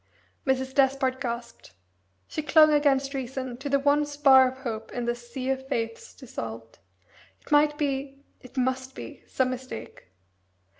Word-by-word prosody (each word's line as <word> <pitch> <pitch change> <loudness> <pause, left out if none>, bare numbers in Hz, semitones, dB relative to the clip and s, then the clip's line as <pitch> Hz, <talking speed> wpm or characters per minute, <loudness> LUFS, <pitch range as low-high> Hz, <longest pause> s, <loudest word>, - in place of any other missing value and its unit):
Mrs. 265 0 0
Despard 265 -1 +2
gasped. 235 - -5 0.5
She - - -3
clung 310 +1 +6
against 280 -2 +2
reason 260 -1 -4
to 275 +3 -5
the 280 - +4
one 285 +1 +3
spar 275 -3 +6
of 260 - -13
hope 225 -3 -5
in 245 -1 -3
this 240 0 -4
sea 260 +1 -2
of 265 0 -3
faiths 230 -2 -3
dissolved. 115 - -8 0.6
It - - -18
might 295 0 +4
be 275 -1 -3 0.2
it 255 +1 -15
must 260 +1 -1
be - - -9
some 255 -1 0
mistake! 255 0 -8
265 Hz, 150 wpm, -27 LUFS, 250-280 Hz, 0.6 s, clung